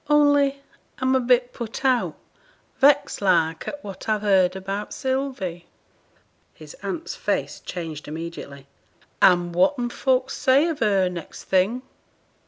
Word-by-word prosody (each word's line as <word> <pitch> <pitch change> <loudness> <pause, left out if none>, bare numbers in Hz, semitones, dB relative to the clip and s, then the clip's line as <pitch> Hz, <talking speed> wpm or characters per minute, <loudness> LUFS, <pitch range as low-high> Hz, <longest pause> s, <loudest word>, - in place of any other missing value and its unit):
Only 285 -2 +3 0.3
I'm 260 0 +1
a 260 - +4
bit 245 0 +2
put 235 +3 -6
out 255 -2 +1 0.6
vexed 285 -3 +3
like 165 -4 +2
at 290 0 -6
what 200 +2 -8
I've 215 -1 0
heerd 190 -3 +3
about 195 +2 -5
Sylvie.' 260 -11 -3 0.9
His - - -12
aunt's 330 -3 -4
face - - -2
changed 165 -4 -7
immediately. 150 -3 -7 0.6
'And 175 -1 +4
whatten 240 +6 +2
folk 260 0 0
say 275 +5 +3
of 320 - -4
her, 200 -4 +2
next 175 -2 -7
thing?' 200 +7 +1
220 Hz, 130 wpm, -23 LUFS, 180-265 Hz, 0.9 s, a